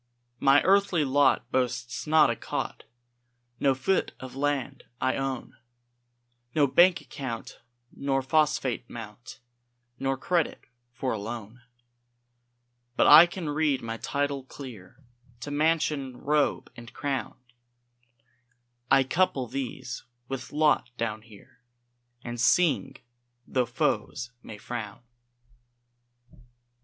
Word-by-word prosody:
My 140 +1 +5
earthly 190 -5 +3
lot 140 0 +2
boasts 125 0 -2
not 155 +1 +5
a - - -2
cot, - - -5 0.7
No 135 -1 +3
foot 135 +9 0
of 130 -1 -9
land 140 -1 -2 0.2
I 130 0 +1
own, 135 -2 -4 1.0
No 150 -2 +5
bank 175 +7 +5
account 125 -5 -7 0.4
nor 135 -1 0
phosphate 130 -4 +1
mount, 115 +1 -10 0.6
Nor 135 0 0
credit 170 +3 -1 0.3
for 125 +2 -3
a 110 - -2
loan; 115 +2 -7 1.3
But - - +4
I 170 +2 +10
can 175 -3 -5
read 145 -4 +1
my 115 0 -4
title 140 +1 -2
clear 130 -2 -11 0.4
To 145 - -5
mansion, 150 -4 0
robe, 150 +2 0
and 120 0 -11
crown; 140 -2 -3 1.5
I 135 -1 +6
couple 135 -2 +1
these 125 -1 -5 0.2
with 130 -1 -6
lot 150 -4 +2
down 110 -1 -2
here, 110 0 -18 0.6
And 120 -1 -5
sing, 140 -3 +3 0.5
tho' 125 -2 0
foes 125 -1 -1
may 105 - -9
frown. 115 -1 -6
135 Hz, 110 wpm, -27 LUFS, 120-145 Hz, 1.5 s, I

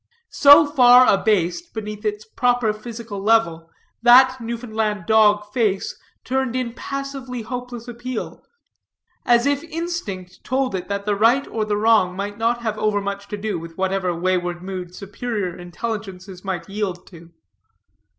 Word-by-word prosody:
So 290 +2 +8
far 255 -3 +6
abased 205 - 0
beneath 210 0 -6
its 210 0 -2
proper 245 -1 +1
physical 220 -2 -8
level, 180 -7 +1 0.3
that 255 +2 +6
Newfoundland 220 -4 -3
dog 210 -1 +3
face 210 -6 0 0.3
turned 260 -1 -1
in 250 -2 -2
passively 275 -2 -6
hopeless 245 0 -7
appeal, 240 0 -6 0.9
as 240 0 +4
if 285 0 +1
instinct 320 - -6
told 260 -1 -1
it 185 -1 -4
that 200 0 -3
the 210 -1 +1
right 235 +7 +3
or 220 -1 -2
the 210 -1 -1
wrong 215 -4 +3
might 205 +2 -5
not 235 +1 0
have 215 -2 -2
overmuch 200 -1 -2
to 210 - -5
do 205 -3 -3
with 165 0 -11
whatever 190 -1 0
wayward 175 0 -1
mood 185 -2 -6
superior 205 -2 -4
intelligences 185 0 -7
might 190 -2 -4
yield 195 -3 -4
to. 170 -2 -15
215 Hz, 140 wpm, -21 LUFS, 195-245 Hz, 0.9 s, So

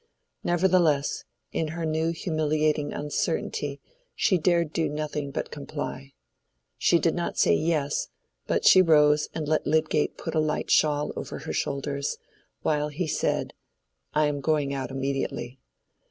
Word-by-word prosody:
Nevertheless, 175 -5 +2 0.3
in 160 - -1
her 165 - -2
new 160 +1 0
humiliating 155 -3 0
uncertainty 145 -1 -2 0.4
she 185 -5 +2
dared 170 -2 +2
do 165 - 0
nothing 150 -1 -3
but - - -4
comply. 140 -2 -6 0.7
She - - +4
did - - +1
not - - -3
say - - +4
yes, 150 - 0 0.4
but - - 0
she 185 - +8
rose 150 -3 +4
and 155 -2 -3
let 155 0 +1
Lydgate 155 0 +1
put - - -5
a 160 - +2
light 155 0 -1
shawl 150 -1 +3
over - - -5
her - - -6
shoulders, 140 0 -2 0.5
while 150 -1 +1
he 150 +4 -3
said, 155 - -1 0.6
"I 155 0 +2
am 145 -1 -1
going 145 -2 +1
out 135 -1 -3
immediately." 135 -1 -3
150 Hz, 140 wpm, -26 LUFS, 145-160 Hz, 0.7 s, she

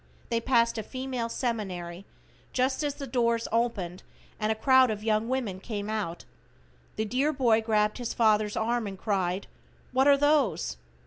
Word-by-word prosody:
They 230 -1 0
passed 235 -2 +2
a - - -1
female 255 0 -4
seminary 195 -7 -3 0.5
just 260 +2 +1
as 290 -1 -1
the 280 - -6
doors 235 -2 +1
opened 210 -6 -1 0.4
and 215 0 +1
a - - +1
crowd 260 +2 +5
of 210 -1 -3
young 220 +1 +1
women 240 -8 -2
came 210 0 -4
out. 190 -6 -3 0.7
The 220 - -1
dear 260 +7 +1
boy 235 -6 +3
grabbed 215 0 +1
his 240 -1 -3
father's 215 -2 +2
arm 230 0 0
and 195 -1 -6
cried, 190 -2 -1 0.5
"What 260 +2 +3
are 285 -1 +7
those?" 285 - +2
230 Hz, 165 wpm, -28 LUFS, 210-255 Hz, 0.7 s, are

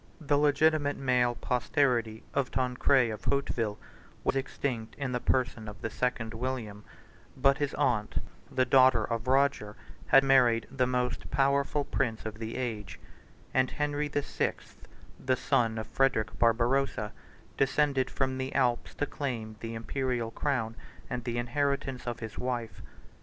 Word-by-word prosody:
The 145 -3 +1
legitimate 145 0 +3
male 125 -2 +2
posterity 120 -4 0
of 135 -2 0
Tancred 125 -1 +2
of 110 - -7
Hauteville 115 -6 0 0.5
was - - +1
extinct 130 -4 -3
in 140 -3 -3
the 125 - 0
person 120 -3 0
of 105 - -8
the 115 - -2
second 125 -3 -1
William; 115 -4 -4 0.5
but 135 +1 +3
his 145 -2 -1
aunt, 120 -7 0 0.3
the 130 - +2
daughter 130 -3 +5
of 115 0 -3
Roger, 135 -6 +2 0.3
had 135 - +7
married 125 -4 +4
the 130 -2 +1
most 125 -1 -1
powerful 140 +1 +2
prince 115 -5 -1
of 110 0 -6
the 115 0 -5
age; 115 -5 -4 0.5
and 130 0 +3
Henry 150 0 -1
the 145 -1 -1
Sixth, - - -4 0.4
the 130 0 +2
son 115 -2 +1
of 110 - -3
Frederic 110 -6 0
Barbarossa, 120 -1 +2 0.4
descended 135 -1 +2
from 130 -1 -1
the 130 0 -4
Alps 125 -3 +1
to 145 - 0
claim 115 -7 -4
the 115 0 -5
Imperial 120 0 -2
crown 125 -4 -1 0.4
and 125 - -3
the 120 -1 -2
inheritance 135 +1 -1
of 120 0 -4
his 110 -2 -6
wife. 120 -5 -3
125 Hz, 145 wpm, -29 LUFS, 115-135 Hz, 0.5 s, had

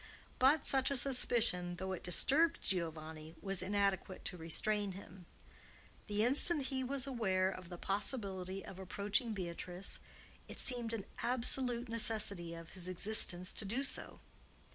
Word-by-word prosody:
But 275 +3 +4
such 265 -1 +2
a 280 - +1
suspicion, 235 -9 +1
though 190 +2 -5
it 185 - -4
disturbed 315 - +3
Giovanni, 160 -3 -2
was 195 -2 -2
inadequate 195 -1 -1
to - - -2
restrain 195 +5 -1
him. 185 -2 -12 0.8
The 210 +1 +1
instant 295 +5 +7
that 265 - -3
he 260 -1 -1
was 265 +1 +1
aware 190 -8 0
of 185 -2 -9
the 175 - -7
possibility 195 -2 -2
of 190 - -10
approaching 205 +5 -1
Beatrice, 180 0 -3 0.5
it - - -8
seemed 240 -3 -1
an 215 -4 -4 0.2
absolute 245 0 +2
necessity 210 -6 0
of 165 0 -10
his 185 -2 -6
existence 185 -1 +2
to - - 0
do 235 +8 -1
so. 275 - -4
200 Hz, 145 wpm, -36 LUFS, 180-245 Hz, 0.8 s, instant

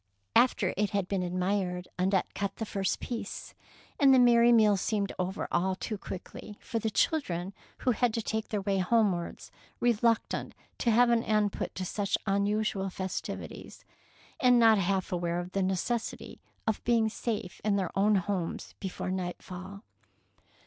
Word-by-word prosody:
'' 100 0 -46
After 210 -7 +4
it 210 0 +1
had 200 -3 -1
been 195 -1 -1
admired, 180 0 -1
Annette 190 0 +1
cut 200 -1 -3
the 225 - -4
first 195 -3 -1
piece, 230 -4 -6 0.5
and 275 -2 +6
the 260 - +7
merry 240 -1 +6
meal 215 -3 +6
seemed 200 +1 -1
over 185 +2 -2
all 185 +2 +1
too 215 - -4
quickly 200 +1 -8
for 230 - -3
the 220 - -1
children 200 - 0 0.3
who 255 - +2
had 240 +1 +2
to 230 - 0
take 220 0 -2
their 210 -2 -2
way 195 -1 +1
homewards, 185 -3 0 0.3
reluctant 230 -1 +1 0.2
to 235 - +1
have 235 +2 +5
an 230 -1 +3
end 210 -2 +1
put - - -4
to 185 - -3
such 200 +2 -1
unusual 200 0 0
festivities, 185 0 -6 0.5
and 250 -1 +5
not 225 -3 +6
half 190 0 0
aware 175 -1 -1
of 175 +1 -6
the 195 - 0
necessity 190 +5 -2 0.2
of 220 -2 -1
being 230 -2 +3
safe 220 -4 -4
in 210 -1 +2
their 190 -4 -2
own 205 +2 +4
homes 185 -3 -2
before 190 -1 -4
nightfall. 185 +2 -6
200 Hz, 165 wpm, -29 LUFS, 185-225 Hz, 0.5 s, the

